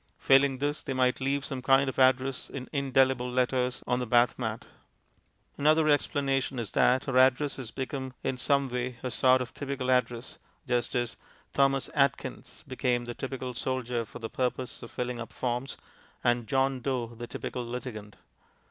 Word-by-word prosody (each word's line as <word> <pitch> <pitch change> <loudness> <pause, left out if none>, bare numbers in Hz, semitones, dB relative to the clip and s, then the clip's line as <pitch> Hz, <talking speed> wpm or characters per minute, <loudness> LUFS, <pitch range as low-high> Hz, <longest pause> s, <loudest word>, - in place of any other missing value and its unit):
Failing 135 0 +4
this, 145 +2 -1
they 135 - -4
might 130 0 +2
leave 140 +1 0
some 135 -2 -4
kind 135 +1 +4
of 130 - -3
address 130 0 +3
in 130 -2 -6
indelible 130 -2 +2
letters 125 0 0
on 125 - +1
the 125 - -3
bath 120 +2 +3
mat. 110 -2 -3 0.9
Another 155 +2 +4
explanation 135 -2 +1
is 115 -4 -4
that 130 +3 +3
our 130 -1 +3
address 130 +2 +3
has 130 -4 -5
become 130 0 -5
in 135 - -1
some 140 +2 +2
way 125 -1 -3
a 125 - -2
sort 130 +1 +4
of 125 - -11
typical 135 -2 -2
address, 120 -1 0 0.3
just 120 -1 0
as 120 -1 -1 0.4
"Thomas 135 -1 +2
Atkins" 140 -2 -1
became 125 -2 0
the 120 - -5
typical 130 0 -5
soldier 125 -1 -2
for 100 - -10
the 115 - -5
purpose 125 +1 -3
of 115 - -9
filling 125 -1 -3
up 115 - -6
forms, 125 +1 -3 0.5
and 120 -1 +1
"John 135 +2 +1
Doe" 125 -2 -2
the 120 +1 -7
typical 125 - -5
litigant. 120 -4 -6
130 Hz, 170 wpm, -29 LUFS, 125-135 Hz, 0.9 s, Failing